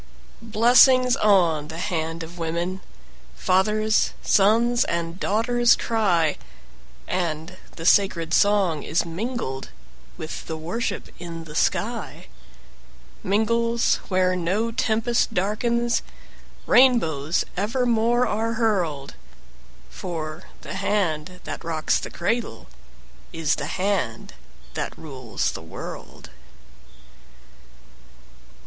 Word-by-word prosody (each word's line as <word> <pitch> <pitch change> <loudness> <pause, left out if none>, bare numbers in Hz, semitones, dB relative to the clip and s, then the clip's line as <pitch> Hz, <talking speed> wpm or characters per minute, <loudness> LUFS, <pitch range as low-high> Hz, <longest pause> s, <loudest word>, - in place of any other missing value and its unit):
Blessings 245 +3 +5
on 175 - +3
the 160 +1 -8
hand 165 -3 -3
of 170 +2 -10
women! 170 +3 -2 0.5
Fathers, 215 - +2
sons, 230 +5 +3
and 170 +1 -3
daughters 235 +3 +3
cry, 180 -9 +1 0.7
And 170 -1 -3 0.2
the 165 - -7
sacred 170 -4 +3
song 195 -7 +3
is 160 +3 0
mingled 170 - -4 0.5
With 160 -2 -7
the 160 - -4
worship 175 +9 -4
in 170 -2 -7
the 155 -2 -11
sky - - -1 1.0
Mingles 230 +3 +1
where 185 -1 +2
no 190 +6 -1
tempest 225 +1 0
darkens, 235 +5 0 0.6
Rainbows 170 - +3
evermore 235 +3 +1
are 225 +1 -1
hurled; 180 - -1 0.8
For 155 - -6 0.2
the - - -7
hand 185 -4 -1
that - - -6
rocks 160 -2 0
the - - -6
cradle 230 +6 -2 0.7
Is 165 -2 0
the 145 - -3
hand 185 - -2 0.4
that - - -4
rules 130 -7 -3
the - - -7
world. 80 - -9
185 Hz, 95 wpm, -24 LUFS, 165-225 Hz, 1.0 s, Blessings